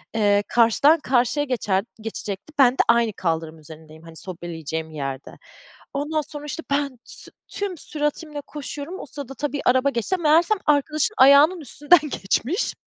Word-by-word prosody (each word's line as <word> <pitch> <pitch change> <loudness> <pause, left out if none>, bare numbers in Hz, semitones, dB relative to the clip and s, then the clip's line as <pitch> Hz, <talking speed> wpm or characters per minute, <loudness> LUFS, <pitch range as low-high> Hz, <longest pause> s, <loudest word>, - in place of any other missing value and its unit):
eee, 205 -1 +3
karşıdan 240 +7 +4
karşıya 265 +2 +1
geçen 205 -6 -1 0.2
geçecekti, 215 +4 -6
ben 250 -2 +6
de - - -16
aynı 235 -2 +3
kaldırım 160 -3 -3
üzerindeyim 155 0 -14
hani 165 -1 -13
sobeleyeceğim 160 -3 -6
yerde. 135 -3 -6 0.6
Ondan 295 +2 -1
sonra 295 0 -7
işte 310 +3 -6
ben 280 -2 -1
tü - - -9 0.2
tüm 400 -3 -4
süratimle 295 0 -3
koşuyorum. 295 +5 -7
O - - -7
sırada 275 -1 -8
tabii 290 0 -3
araba 260 +2 +3
geçti 275 - -1
meğersem 335 +5 +3
arkadaşın 300 +6 +1
ayağının 285 +6 +6
üstünden 295 +4 +3
geçmiş. 290 - -1
270 Hz, 145 wpm, -23 LUFS, 195-300 Hz, 0.6 s, ben